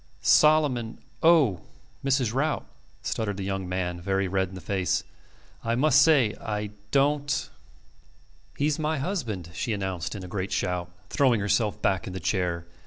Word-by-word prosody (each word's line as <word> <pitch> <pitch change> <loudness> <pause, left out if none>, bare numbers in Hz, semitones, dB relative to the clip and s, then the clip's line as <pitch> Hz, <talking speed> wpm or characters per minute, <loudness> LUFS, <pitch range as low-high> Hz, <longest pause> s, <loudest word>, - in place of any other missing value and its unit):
"Solomon.... 145 -7 +4 0.2
Oh!... 145 - +5 0.4
Mrs. 130 -4 +1
Rout," 150 +4 0 0.4
stuttered 105 -3 -2
the 100 - -4
young 95 -1 -3
man, 90 -1 -2
very 95 +1 0
red 95 0 0
in 95 - -10
the - - -6
face, 95 +1 -1 0.6
"I 115 0 0
must 145 +2 +5
say... 140 -9 +4
I 105 -1 -3 0.2
don't... 145 +1 +1 0.5
." - - -31
"He's 150 +2 +1
my 155 0 0
husband," 120 - -3
she 115 +5 -2
announced 95 -3 -3
in 100 - -6
a - - -7
great 95 +1 -4
shout, 90 -2 -1 0.2
throwing 130 -5 +3
herself 105 +1 +1
back 95 -2 +1
in 95 - -5
the 95 - -4
chair. 85 -1 -1
105 Hz, 160 wpm, -26 LUFS, 95-140 Hz, 0.6 s, Oh